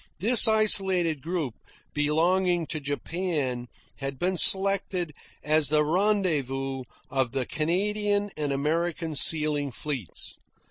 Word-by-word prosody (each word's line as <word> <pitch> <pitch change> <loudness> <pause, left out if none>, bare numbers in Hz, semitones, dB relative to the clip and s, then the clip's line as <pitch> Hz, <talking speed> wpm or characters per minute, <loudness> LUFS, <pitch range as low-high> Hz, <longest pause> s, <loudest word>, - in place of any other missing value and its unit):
This 225 +6 +6
isolated 190 -8 +2
group, 160 -6 -3 0.4
belonging 170 +4 +1
to 155 - -5
Japan, 145 -3 -3 0.3
had 135 -1 -5
been 185 +6 -1
selected 190 -3 +3 0.3
as 155 -2 +1
the 150 0 +2
rendezvous 150 -8 -1 0.3
of 130 -3 -1
the 130 -2 -2
Canadian 205 - -1
and 145 -2 -3
American 160 +3 -2
sealing 150 -1 +2
fleets. 130 - -5
160 Hz, 105 wpm, -26 LUFS, 145-185 Hz, 0.4 s, This